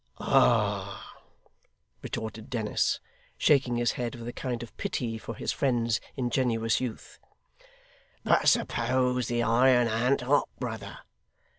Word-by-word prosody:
'Ah!' - - +1 0.9
retorted 110 -1 -6
Dennis, 110 -4 0 0.4
shaking 130 -4 +3
his 120 -1 +1
head, 120 -1 -4
with 120 -1 -8
a 120 - -5
kind 120 -2 -4
of 120 - -12
pity 115 -3 -3
for 115 - -7
his - - -2
friend's 120 -5 0
ingenuous 120 -3 0
youth; 125 -4 -6 1.0
'but - - +4
suppose 125 +1 +1
the 120 0 0
iron 120 +1 +4
an't 120 +5 +1
hot, 140 +4 +2
brother! - - -6
120 Hz, 120 wpm, -28 LUFS, 115-125 Hz, 1.0 s, but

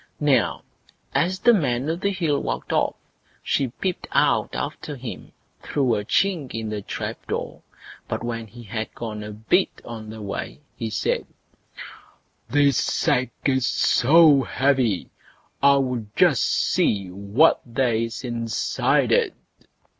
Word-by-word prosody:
Now, 145 -3 +2 0.5
as 185 +2 +1
the 240 +5 +5
Man 135 - 0
o' 160 - 0
the 190 +3 -1
Hill 165 -7 0
walked - - -3
off, - - +1 0.5
she 135 - +1
peeped 180 +9 -4
out - - +2
after - - -4
him - - -8 0.3
through 130 -5 0
a 105 -2 -1
chink 160 - 0
in 110 -1 -3
the 105 -1 -3
trap - - -6
door; - - -4 0.5
but - - -3
when 115 -1 -4
he 120 +3 -12
had 110 +1 -5
gone 110 -2 -5
a 105 - -7
bit 110 - +1 0.2
on 110 -2 -8
the 110 0 -8
way, 100 +6 -5 0.2
he 115 -3 -4
said: - - -1 1.2
"This 140 -2 +3
sack 125 0 +1 0.2
is 130 -2 +2
so 150 +2 +5
heavy, 130 -8 +1 0.5
I'll 130 -5 +3
just - - +4
see 100 -3 +1
what 100 - +3
there 120 0 0
is 115 +2 -2
inside 115 -3 0
it." - - +2
125 Hz, 140 wpm, -23 LUFS, 110-145 Hz, 1.2 s, the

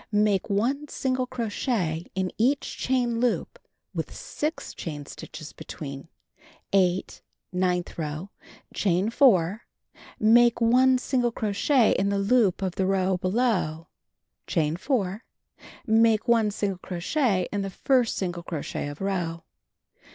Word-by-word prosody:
Make 205 -2 +2
1 255 +9 0
single 255 -2 -1
crochet 210 - -2
in 190 -1 -1
each 270 +5 +1
chain 245 -3 0
loop 245 -1 -1 0.3
with - - -4
6 305 +2 -4
chain 145 -3 -6
stitches 155 +2 -9
between. 140 -1 -8 0.7
8. 185 -1 +1 0.3
Nmth 180 -1 -1
row: 155 +5 -4 0.4
Chain 190 +2 +1
4. 210 - +4 0.6
Make 235 +2 +5
1 255 +3 +5
single 250 -2 0
crochet 220 +4 +2
in 195 +2 +1
the 200 - 0
loop 200 -2 +2
of 185 -2 -1
the 190 - +1
row 190 -1 +1
below. 185 -5 0 0.6
Chain 155 -1 +1
4. 205 - -1 0.6
Make 225 +1 +3
1 230 -3 +4
single 200 -2 -2
crochet 185 - 0
in 205 - 0
the 195 - -3
first 250 +4 +1
single 175 -2 -3
crochet 160 -3 -4
of 145 +3 -8
row. 175 -4 -2
200 Hz, 125 wpm, -26 LUFS, 180-240 Hz, 0.7 s, Make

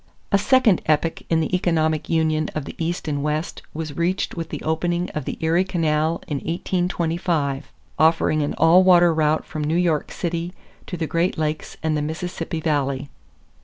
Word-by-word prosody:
= - - -39
A 200 - +5
second 240 -4 +4
epoch 155 +2 +1
in 165 -1 +3
the 160 +3 0
economic 160 -3 0
union 155 -2 +1
of 155 -3 -3
the - - -7
East 170 +1 -3
and 145 -2 -1
West 150 +3 -2
was 155 -2 -5
reached 175 +3 -1
with 165 -2 -5
the - - -6
opening 175 +2 -1
of 150 - -4
the - - -4
Erie 165 +3 +3
Canal 160 -3 0
in 145 - -2
1825, 170 -3 -1 0.3
offering 160 -1 +3
an 145 - -1
all 165 +4 +6
water 175 -2 +6
route 155 0 +1
from 155 - -5
New 155 +3 +1
York 170 -4 +1
City 170 0 -3 0.3
to 180 - -5
the 165 - -1
Great 170 +4 0
Lakes 155 0 -3
and 160 -1 +1
the 150 - 0
Mississippi 165 +1 -4
Valley. 140 -3 -1
160 Hz, 180 wpm, -22 LUFS, 155-175 Hz, 0.3 s, all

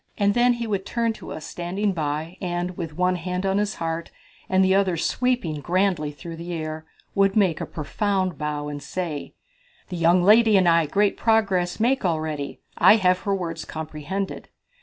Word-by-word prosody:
And 200 -1 +3
then 245 +2 +4
he 235 -1 -4
would 200 -3 -1
turn 230 +2 -1
to - - -10
us 155 - -6
standing 190 +4 -2
by, 155 +1 -3
and 175 0 -2
with 165 -4 -6
one 180 0 +2
hand 180 +2 -3
on 195 +1 +2
his 210 0 -1
heart, 165 0 -3 0.4
and 190 0 +4
the 190 - +3
other 190 -3 +2
sweeping 240 -5 0
grandly 180 -3 +1
through 165 +3 -9
the 170 +1 -6
air, 155 -1 -5 0.3
would 195 -1 +3
make 190 -7 +2
a - - -3
profound 185 +4 -1
bow 150 -1 -3
and 145 -1 -5
say: 155 0 -5 0.5
"The 180 - -4
young 170 +2 +4
lady 215 +1 +6
and 185 -2 +3
I 165 -2 +4
great 200 +5 +1
progress 195 -6 +1
make 255 +4 +2
already. 155 -5 -2 0.2
I - - +8
have 185 -4 +3
her 200 +1 -1
words 165 -3 -4
comprehended. 160 +5 -5
180 Hz, 180 wpm, -24 LUFS, 160-200 Hz, 0.5 s, I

